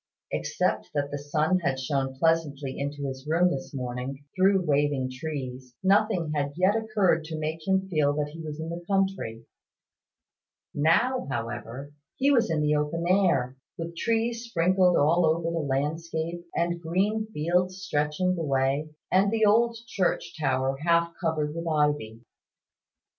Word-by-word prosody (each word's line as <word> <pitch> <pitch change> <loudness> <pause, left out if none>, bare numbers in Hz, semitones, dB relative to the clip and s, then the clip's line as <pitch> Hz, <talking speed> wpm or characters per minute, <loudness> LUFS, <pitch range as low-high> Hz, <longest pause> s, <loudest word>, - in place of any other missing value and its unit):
Except - - -1
that 145 -1 -1
the 145 - -3
sun 155 +5 +1
had 135 -6 -1
shone 135 0 -1
pleasantly 145 -3 0
into 140 +1 -3
his 135 +1 -6
room 170 +3 +3
in - - -3
the 135 - -5
morning, 130 +2 -5
through 190 0 +3
waving 145 -3 +1
trees, 130 -3 -6
nothing 195 -4 +2
had 145 -1 -1
yet 185 +4 +3
occurred 210 -7 +2
to 160 0 -5
make 155 +2 -4
him 190 0 +2
feel 155 -6 +2
that 150 -1 -1
he 165 +2 -9
was 155 -1 -6
in 160 +1 -4
the 170 +1 -5
country. 190 - -1 1.3
Now, 235 - +2
however, 120 +3 -5 0.2
he 275 +2 +3
was 235 -7 +3
in 155 -2 +1
the 150 0 +2
open 150 +3 -1
air, 170 -10 +2 0.2
with 170 0 -5
trees 230 +4 0
sprinkled 180 -3 +3
all 165 +5 +4
over 160 +1 +2
the 170 - -1
landscape, 160 +4 -2
and 170 0 0
green 200 +6 0
fields 180 0 0
stretching 150 +3 0
away, 140 0 0 0.2
and 195 +2 +4
the 220 -1 +3
old 230 +3 +4
church 190 -5 -1
tower 135 -3 0
half 170 +2 +2
covered 155 -3 0
with 165 +1 -5
ivy. 150 -8 0
160 Hz, 155 wpm, -27 LUFS, 145-185 Hz, 1.3 s, all